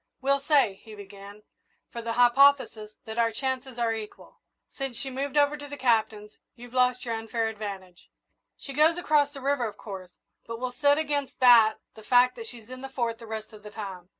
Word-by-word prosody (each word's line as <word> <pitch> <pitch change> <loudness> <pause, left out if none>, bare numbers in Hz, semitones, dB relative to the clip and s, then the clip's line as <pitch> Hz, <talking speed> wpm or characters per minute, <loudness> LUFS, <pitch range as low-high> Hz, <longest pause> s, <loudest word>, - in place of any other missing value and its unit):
"We'll 275 +1 +2
say," 275 -9 +2
he 220 -2 -12
began, 200 +1 -12 0.5
"for 235 - -6
the 230 0 -3
hypothesis, 245 -3 +4
that 220 +1 -5
our 230 -1 +3
chances 260 +1 -4
are 230 -1 +1
equal. 220 -1 -9 0.3
Since 270 -4 -4
she 270 +1 -5
moved 275 +2 -3
over 290 0 +4
to 290 -1 -9
the 285 0 -8
Captain's 220 -4 0 0.2
you've 245 0 -13
lost 250 0 +2
your 230 - -2
unfair 225 0 -2
advantage. 195 -5 -8 0.5
She 275 - -9
goes 310 +4 +4
across 300 -4 +2
the 285 -2 -11
river, 275 -3 0
of 210 - -9
course, 190 -4 -8 0.4
but 230 0 -6
we'll 255 0 -3
set 285 0 +5
against 290 -3 -2
that 235 -4 +7 0.2
the 220 - -13
fact 245 +3 +4
that 455 -1 -7
she's 235 - -12
in 255 0 -7
the 270 - -7
Fort 235 -4 -2
the 230 - -11
rest 220 0 -7
of 210 - -13
the 210 - -10
time. 195 -4 -8
240 Hz, 205 wpm, -27 LUFS, 220-275 Hz, 0.5 s, that